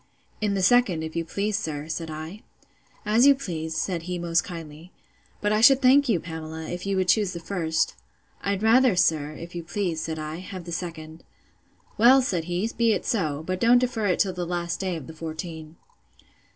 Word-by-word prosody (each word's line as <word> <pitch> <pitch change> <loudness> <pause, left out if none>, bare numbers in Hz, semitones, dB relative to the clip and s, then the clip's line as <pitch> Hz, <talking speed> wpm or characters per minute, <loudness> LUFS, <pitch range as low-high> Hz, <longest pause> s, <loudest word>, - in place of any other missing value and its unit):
In 205 -1 0
the 190 - 0
second, 195 -6 +3
if 160 0 -6
you 170 - 0
please, 200 +5 -2
sir, 150 -5 -5
said 165 0 -4
I.—As 210 - -2
you 280 - +7
please, 160 -9 -5
said 175 0 -1
he 180 - -2
most 170 0 +1
kindly; 165 -1 -9 0.5
but 210 0 +1
I 215 - +2
should 265 +3 +7
thank 275 +1 +5
you, 200 -7 +3
Pamela, 160 -1 -7
if 175 +2 -5
you 195 -1 0
would 185 -1 +1
choose 200 -1 +2
the 170 - -5
first. 165 -3 -1 0.5
I'd 200 +1 -2
rather, 240 0 +5
sir, 155 -4 +1
if 170 +3 -9
you 175 - -4
please, 175 -2 -2
said 160 0 -4
I, 155 +1 -5
have 185 0 -8
the 170 - -8
second. 165 -2 -6 0.8
Well, 255 +4 +7
said 175 -9 -1
he, 175 +5 -1
be 230 -1 +3
it - - -3
so; 155 -9 -1
but 185 +1 -2
don't 235 +3 +5
defer 245 -4 0
it 180 - +2
till 190 -2 +1
the 180 0 -4
last 170 0 -3
day 185 -2 -2
of 160 -5 -7
the 160 - -10
fourteen. 160 0 -7
175 Hz, 200 wpm, -25 LUFS, 160-210 Hz, 0.8 s, you